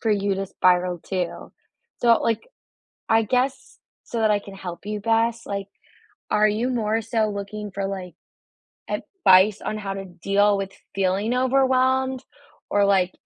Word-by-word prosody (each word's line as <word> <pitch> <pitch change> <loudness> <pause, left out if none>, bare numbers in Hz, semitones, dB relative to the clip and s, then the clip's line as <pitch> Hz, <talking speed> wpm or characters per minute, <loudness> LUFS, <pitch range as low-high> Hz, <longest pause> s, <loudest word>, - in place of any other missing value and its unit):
for 225 - 0
you 200 -1 +1
to 195 +1 -3
spiral 180 -1 +2
too. 180 0 -4 0.5
So, 235 -1 +5
like, 225 -1 0 0.6
I 225 0 +4
guess 255 +4 -1 0.3
so 230 - -4
that 220 - +3
I 210 - +3
can 200 -1 -11
help 185 -1 -8
you 210 0 -3
best, 230 +1 +1
like, 200 0 -4 0.6
are 210 0 +4
you 225 +5 0
more 225 -2 0
so 220 -1 0
looking 205 +1 -5
for, 195 +1 -2
like, 185 -3 -6 0.7
advice 205 - +3
on 215 - -3
how 195 -2 -4
to 195 0 -5
deal 200 +3 +2
with 195 0 -4 0.2
feeling 195 +4 0
overwhelmed 260 0 +2 0.5
or, 205 0 +3
like, 190 -2 +2
210 Hz, 155 wpm, -23 LUFS, 195-230 Hz, 0.7 s, So